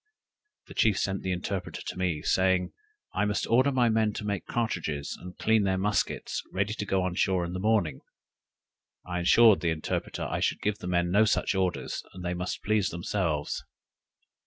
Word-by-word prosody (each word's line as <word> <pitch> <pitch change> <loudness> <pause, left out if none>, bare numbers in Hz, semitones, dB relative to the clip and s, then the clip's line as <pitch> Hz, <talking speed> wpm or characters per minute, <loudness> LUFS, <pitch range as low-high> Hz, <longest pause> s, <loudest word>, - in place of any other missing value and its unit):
The - - -12
chief 105 -3 +3
sent 95 0 -1
the 95 - -2
interpreter 90 0 -4
to - - -5
me, 90 -5 -1
saying, 95 -1 +2 0.4
I - - +1
must 105 0 0
order 130 +4 +3
my 125 -3 +3
men 110 -1 +2
to 105 - -5
make 100 -3 -3
cartridges 85 -11 -2
and 90 0 -10
clean 110 0 +3
their 95 -1 +1
muskets, 105 +2 -1
ready 100 +3 0
to 105 - -4
go 95 -1 +1
on 90 -1 -1
shore 90 0 +1
in 85 - -5
the 90 - -3
morning. 100 -9 +1 1.0
I 90 -1 -3
assured 110 +4 +6
the 85 - 0
interpreter 80 -1 -3
I - - -2
should - - 0
give 105 0 0
the 90 - -6
men 90 -1 +1
no 105 +4 +5
such 105 - +1
orders, 95 -2 -1
that 95 - -9
they 90 0 -1
must 90 +1 -4
please 105 -2 +2
themselves. 85 -4 -2
95 Hz, 185 wpm, -28 LUFS, 90-105 Hz, 1.0 s, assured